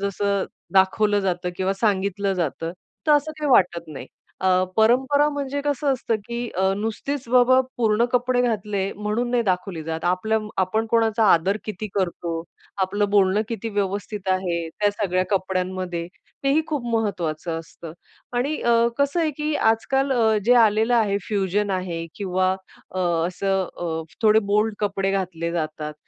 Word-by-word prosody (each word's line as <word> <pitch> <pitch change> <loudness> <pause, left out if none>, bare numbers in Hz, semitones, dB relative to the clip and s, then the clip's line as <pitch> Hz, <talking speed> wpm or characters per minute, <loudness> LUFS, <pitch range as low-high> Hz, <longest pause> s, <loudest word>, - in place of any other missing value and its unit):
जसं 200 0 0 0.3
दाखवलं 205 +2 +3
जातं 180 -2 -1
किंवा 190 +2 0
सांगितलं 200 -2 +1
जातं 165 -1 -2 0.3
तर 305 - +5
असं 295 +1 +2
काही 300 -2 -1
वाटत 175 -7 +3
नाही. 150 -3 -8 0.3
अ, 190 - +2 0.3
परंपरा 265 +6 +4
म्हणजे 285 -1 -3
कसं 290 -1 +1
असतं, 240 -3 -1
की 240 0 -4
अ, 190 +1 +2
नुसतीच 230 +5 -3
बाबा 250 +1 +5 0.2
पूर्ण 225 -1 +2
कपडे 250 0 +2
घातले 210 -4 -1
म्हणून 210 +4 -1
नाही 245 -1 +2
दाखवली 180 -4 -2
जात. 160 0 -4
आपल्या 185 +5 +1 0.2
आपण 220 +5 0
कोणाचा 225 -1 +3
आदर 185 +5 +2
किती 215 0 -5
करतो, 175 -3 -2 0.4
आपलं 205 +2 0
बोलणं 200 0 +3
किती 230 -1 -4
व्यवस्थित 200 -1 -3
आहे 175 -3 -1
त्या 205 +5 0
सगळ्या 185 -3 0
कपड्यांमध्ये, 185 -2 -2 0.4
तेही 275 +3 +4
खूप 295 -4 -2
महत्वाचं 170 -7 -2
असतं 165 0 -10 0.4
आणि 275 +5 0
अ, 235 0 +4
कसं 280 +4 +1
आहे 320 -2 +1
की 300 0 -1
आजकाल, 265 +5 +1
अ, 225 -3 +3
जे 245 +3 +5
आलेलं 225 0 +4
आहे 210 -4 +2
फ्युजन 205 0 0
आहे 180 -3 -3
किंवा 185 -2 0 0.4
अ, 185 - -5 0.3
असं 190 +1 -1
अ, 160 -2 -3 0.2
थोडे 215 0 +6
बोल्ड 210 +1 +2
कपडे 195 -2 0
घातले 175 -4 -2
जातात, 155 -2 -3
205 Hz, 150 wpm, -23 LUFS, 185-235 Hz, 0.4 s, थोडे